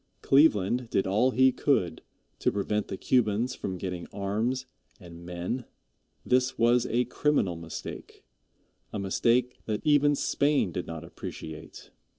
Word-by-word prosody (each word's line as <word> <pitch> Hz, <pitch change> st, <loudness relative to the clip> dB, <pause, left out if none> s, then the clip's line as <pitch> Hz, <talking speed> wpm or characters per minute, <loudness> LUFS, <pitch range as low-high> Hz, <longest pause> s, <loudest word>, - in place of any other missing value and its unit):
Cleveland 125 Hz, -4 st, +3 dB
did 95 Hz, -, +1 dB
all 105 Hz, +7 st, +3 dB
he 130 Hz, 0 st, +4 dB
could 90 Hz, -, 0 dB, 0.4 s
to -, -, +2 dB
prevent 105 Hz, +1 st, -1 dB
the 95 Hz, -, -5 dB
Cubans 120 Hz, +2 st, +1 dB
from 95 Hz, -7 st, -5 dB
getting 90 Hz, -1 st, -5 dB
arms 110 Hz, +7 st, -1 dB, 0.3 s
and 85 Hz, -3 st, -12 dB
men. 90 Hz, +8 st, -4 dB, 0.6 s
This 125 Hz, +1 st, +2 dB
was 120 Hz, +1 st, +3 dB
a 120 Hz, +2 st, +1 dB
criminal 125 Hz, -, +1 dB
mistake 80 Hz, -1 st, -8 dB, 0.7 s
a -, -, -4 dB
mistake 115 Hz, +5 st, +1 dB
that 110 Hz, +6 st, -3 dB
even 145 Hz, -1 st, +4 dB
Spain 140 Hz, -7 st, +1 dB
did 90 Hz, -, -4 dB
not 80 Hz, 0 st, -6 dB
appreciate. 80 Hz, -1 st, -9 dB
110 Hz, 135 wpm, -28 LUFS, 90-130 Hz, 0.7 s, he